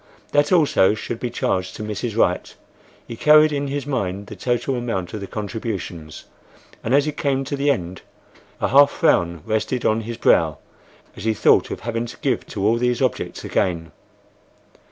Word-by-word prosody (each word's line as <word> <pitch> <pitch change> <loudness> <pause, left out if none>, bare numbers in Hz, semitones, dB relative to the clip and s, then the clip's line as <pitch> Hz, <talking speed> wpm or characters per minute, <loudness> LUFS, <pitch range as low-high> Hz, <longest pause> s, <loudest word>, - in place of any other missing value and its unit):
That 145 0 +2
also 145 - +4
should 115 +2 -5
be 125 - -3
charged 95 -5 -2
to - - -6
Mrs. 105 -1 -4
Wright. - - +1 0.5
He 115 - -6
carried 150 +4 +6
in 140 -1 -2
his 140 0 -3
mind 100 -8 -2
the - - -9
total 120 +1 -1
amount 115 -8 -3
of 110 - -4
the 100 - -6
contributions, 100 -8 -6 0.6
and 120 +4 +2
as 145 0 +4
he 150 - -1
came 140 -2 -1
to 140 - -3
the 140 +1 0
end 95 -9 -2 0.6
a - - 0
half 140 +2 +7
frown 85 - +1
rested 110 +3 -1
on 110 +1 +2
his 115 +1 -6
brow - - +3 0.6
as - - -9
he 110 -1 +1
thought - - +4
of - - -6
having 115 +1 -3
to - - -10
give - - -1
to 95 - -3
all 115 +2 +3
these 125 0 0
objects 130 -2 -2
again. 85 -3 -1
115 Hz, 180 wpm, -21 LUFS, 100-140 Hz, 0.6 s, half